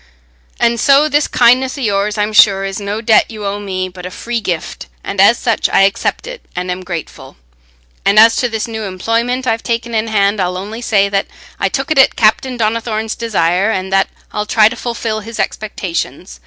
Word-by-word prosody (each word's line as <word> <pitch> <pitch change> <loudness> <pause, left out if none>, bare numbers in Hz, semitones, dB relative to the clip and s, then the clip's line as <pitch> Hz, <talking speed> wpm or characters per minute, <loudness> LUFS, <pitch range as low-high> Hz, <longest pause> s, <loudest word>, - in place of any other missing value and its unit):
And 235 0 +2
so 280 +5 +4
this 295 0 +1
kindness 255 +3 +3
o' - - -6
yours, 205 -1 0
I'm 210 +1 -1
sure, 195 -3 +5
is 195 +1 -4
no 205 +2 -3
debt 220 -1 +3
you 215 -2 -7
owe 200 +1 -2
me, 185 -2 -3
but 180 -1 -11
a 180 - -5
free 235 +5 -4
gift, 175 -6 -4 0.2
and 195 -1 -1
as 230 +4 +6
such 230 -2 0
I - - +3
accept 195 0 0
it - - -8
and 180 0 -3
am 180 +1 -4
thankful. 165 -6 -7 0.7
And 200 +1 +2
as 225 +1 +7
to 245 - 0
this 225 -1 -3
new 220 -1 -5
employment 230 +6 -2
I've 225 -2 0
taken 235 0 -3
in 220 0 0
hand, 200 -1 +1
I'll 180 0 -1
only 210 +5 -7
say 200 -4 +2
that 195 0 -1 0.3
I - - +1
took - - -3
it 295 - +3
at 265 - +5
Captain 245 +3 +1
Donnithorne's 220 0 -1
desire, 195 -3 0
and 190 -2 -2
that 195 0 +2 0.2
I'll 210 0 -3
try 215 0 +4
to 240 - -7
fulfil 235 -2 -3
his 225 +1 -9
expectations. 180 - -4
215 Hz, 205 wpm, -15 LUFS, 195-235 Hz, 0.7 s, as